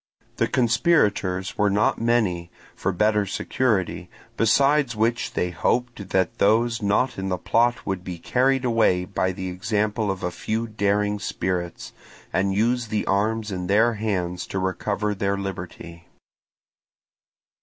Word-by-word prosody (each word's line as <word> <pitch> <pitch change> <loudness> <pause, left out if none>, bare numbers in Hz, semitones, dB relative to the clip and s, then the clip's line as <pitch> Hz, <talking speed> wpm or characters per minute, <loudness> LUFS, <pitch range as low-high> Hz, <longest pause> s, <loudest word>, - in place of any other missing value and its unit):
The - - +2
conspirators 110 - +1
were 105 0 +4
not 105 +3 +1
many, 105 -8 +1 0.3
for 100 - -1
better 105 +2 +2
security, 105 -2 -1 0.3
besides 135 +3 +3
which 115 +2 0
they 90 - -1
hoped 120 +2 -1
that 95 -2 0
those 115 +3 +3
not 105 +4 +1
in 95 0 -3
the 90 - 0
plot 120 +6 +1
would 95 -2 -3
be 90 -2 -6
carried 130 +7 +1
away 110 -7 +2
by 95 -1 -1
the 95 0 -5
example 105 +3 -1
of 95 -1 -3
a 90 - -1
few 110 +5 -2
daring 105 -1 0
spirits, 90 -3 -3 0.4
and 95 +1 +1
use 120 +3 +1
the 105 -1 -1
arms 105 +2 0
in 90 -1 -4
their 110 +5 +4
hands 95 -5 -2
to - - -4
recover 100 +2 -1
their 100 0 -1
liberty. 90 -3 -7
105 Hz, 140 wpm, -24 LUFS, 95-115 Hz, 0.4 s, were